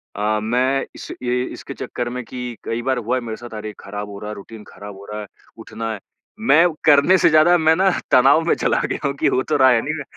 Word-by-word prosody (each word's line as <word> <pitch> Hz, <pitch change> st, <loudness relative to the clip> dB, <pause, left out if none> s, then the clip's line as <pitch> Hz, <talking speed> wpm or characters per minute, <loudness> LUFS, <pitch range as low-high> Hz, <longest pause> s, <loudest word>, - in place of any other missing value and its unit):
अ, 105 Hz, +1 st, 0 dB
मैं 125 Hz, +5 st, 0 dB
इस -, -, -9 dB
ये 125 Hz, 0 st, 0 dB
इसके -, -, -9 dB
चक्कर 120 Hz, -1 st, -5 dB
में 125 Hz, 0 st, -5 dB
कि 125 Hz, -1 st, -6 dB
कई 115 Hz, +1 st, -2 dB
बार 130 Hz, +1 st, -1 dB
हुआ 120 Hz, +2 st, -1 dB
है -, -, -3 dB
मेरे 110 Hz, -2 st, -6 dB
साथ 120 Hz, -1 st, -11 dB
अरे! 105 Hz, 0 st, -6 dB
ख़राब 105 Hz, 0 st, -7 dB
हो 100 Hz, -, -9 dB
रहा 105 Hz, +1 st, -7 dB
है, 105 Hz, -, -6 dB
रूटीन 105 Hz, +2 st, -11 dB
खराब 100 Hz, -1 st, -11 dB
हो 100 Hz, -, -12 dB
रहा 105 Hz, 0 st, -5 dB
है, 105 Hz, -, -9 dB, 0.3 s
उठना 115 Hz, 0 st, -6 dB
है। 105 Hz, -, -7 dB, 0.4 s
मैं 175 Hz, -7 st, +5 dB, 0.2 s
करने 150 Hz, +5 st, +6 dB
से -, -, +4 dB
ज़्यादा 155 Hz, +3 st, +5 dB
मैं 160 Hz, -1 st, +3 dB
ना 190 Hz, +3 st, +3 dB, 0.2 s
तनाव 135 Hz, +5 st, +5 dB
में -, -, +2 dB
चला -, -, 0 dB
गया -, -, -4 dB
हूँ 140 Hz, -, -2 dB
कि -, -, +3 dB
हो 130 Hz, -, +1 dB
तो 155 Hz, -, -1 dB
रहा 130 Hz, -1 st, +6 dB
है 115 Hz, -2 st, +3 dB
नहीं 155 Hz, +2 st, -3 dB
है, 145 Hz, -, -5 dB
125 Hz, 260 wpm, -20 LUFS, 110-140 Hz, 0.4 s, करने